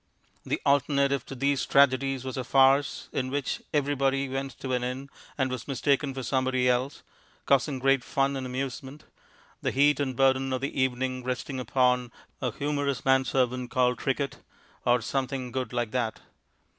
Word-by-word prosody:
The -, -, -2 dB
alternative 140 Hz, -1 st, +2 dB
to 135 Hz, -, -7 dB
these 140 Hz, +1 st, +1 dB
tragedies 135 Hz, -1 st, +3 dB
was 130 Hz, -, -4 dB
a 130 Hz, -, -2 dB
farce, 135 Hz, +2 st, +3 dB
in 130 Hz, -1 st, -1 dB
which 140 Hz, 0 st, -2 dB
everybody 140 Hz, -1 st, +1 dB
went 135 Hz, -1 st, -5 dB
to 130 Hz, -, -4 dB
an 125 Hz, -1 st, 0 dB
inn 130 Hz, +3 st, -4 dB, 0.3 s
and 130 Hz, -2 st, 0 dB
was 125 Hz, -3 st, -5 dB
mistaken 140 Hz, +1 st, +1 dB
for 130 Hz, -, -4 dB
somebody 130 Hz, 0 st, +1 dB
else 125 Hz, +3 st, 0 dB, 0.4 s
(causing 140 Hz, 0 st, +2 dB
great 135 Hz, 0 st, +2 dB
fun 135 Hz, +1 st, 0 dB
and 130 Hz, -1 st, -4 dB
amusement), 135 Hz, +2 st, -5 dB, 0.6 s
the -, -, 0 dB
heat 145 Hz, +1 st, +3 dB
and 130 Hz, -3 st, -1 dB
burden 135 Hz, 0 st, +2 dB
of 130 Hz, -, -2 dB
the 135 Hz, -1 st, -2 dB
evening 130 Hz, 0 st, -1 dB
resting 130 Hz, +1 st, -3 dB
upon 125 Hz, -1 st, +1 dB, 0.3 s
a 125 Hz, -, 0 dB
humorous 145 Hz, +1 st, -2 dB
man 130 Hz, 0 st, +4 dB
servant 125 Hz, -1 st, 0 dB
called 125 Hz, -1 st, +1 dB
Trickett 140 Hz, +1 st, -1 dB, 0.5 s
(or 120 Hz, -1 st, +4 dB
something 130 Hz, 0 st, -2 dB
good 130 Hz, -2 st, -3 dB
like 120 Hz, -3 st, -2 dB
that). 120 Hz, -3 st, -1 dB
130 Hz, 165 wpm, -27 LUFS, 125-140 Hz, 0.6 s, man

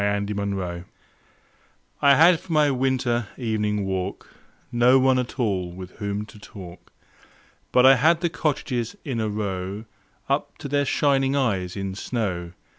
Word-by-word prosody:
Good 100 Hz, 0 st, -1 dB
Hours 95 Hz, -4 st, -3 dB, 1.2 s
I 140 Hz, -1 st, +6 dB
HAD 165 Hz, +2 st, +6 dB
for 185 Hz, -, -12 dB
my 150 Hz, -2 st, +4 dB
winter 125 Hz, -3 st, 0 dB
evening 105 Hz, -4 st, -1 dB
walk 95 Hz, 0 st, -4 dB, 0.4 s
No 120 Hz, +2 st, +5 dB
one 130 Hz, 0 st, +3 dB
at 125 Hz, 0 st, -4 dB
all 95 Hz, -7 st, 0 dB
with 90 Hz, +1 st, -9 dB
whom 100 Hz, 0 st, -3 dB
to 105 Hz, 0 st, -15 dB
talk, 90 Hz, -4 st, -12 dB, 0.8 s
But 125 Hz, -, +5 dB
I 135 Hz, 0 st, +8 dB
had 160 Hz, +6 st, +3 dB
the 170 Hz, -, +1 dB
cottages 140 Hz, -, -2 dB
in 130 Hz, -6 st, -2 dB
a 110 Hz, -1 st, -1 dB
row 100 Hz, 0 st, -4 dB, 0.4 s
Up 140 Hz, +2 st, -1 dB
to 150 Hz, -, -7 dB
their 145 Hz, 0 st, +1 dB
shining 135 Hz, -1 st, +2 dB
eyes 100 Hz, -10 st, 0 dB
in 95 Hz, -1 st, -3 dB
snow. 95 Hz, -5 st, -3 dB
110 Hz, 150 wpm, -24 LUFS, 100-135 Hz, 1.2 s, I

